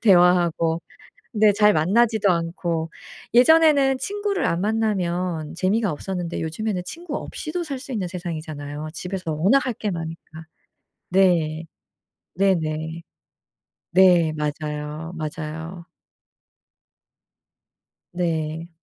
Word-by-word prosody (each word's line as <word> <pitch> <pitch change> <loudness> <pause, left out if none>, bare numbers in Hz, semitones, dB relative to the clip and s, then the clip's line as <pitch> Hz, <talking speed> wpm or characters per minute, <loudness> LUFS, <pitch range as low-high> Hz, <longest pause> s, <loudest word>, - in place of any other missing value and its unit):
대화하고 175 -4 +4 0.5
네 215 -1 +5
잘 210 0 +5
만나지도 210 +6 +3
않고. 165 -1 -2 0.4
예전에는 280 +1 +5
친구를 405 +2 -1
안 170 +1 0
만나면 180 -7 -1
재미가 195 +4 +1
없었는데 175 +2 -4
요즘에는 180 +4 -2
친구 335 - -6
없이도 345 +3 -5
살 280 -5 -5
수 270 - -9
있는 200 -6 -2
세상이잖아요. 155 -4 -6
집에서 180 -1 -4
워낙 195 - +3
할 250 - -1
게 215 -1 -3
많으니까. 165 -1 -7 0.6
네. 170 -4 +2 0.7
네네. 160 -4 0 0.9
네. 175 -3 +5
맞아요, 150 +2 -4
맞아요. 160 +2 -6 2.3
네. 165 -1 -2
175 Hz, 225 characters per minute, -23 LUFS, 160-210 Hz, 2.3 s, 네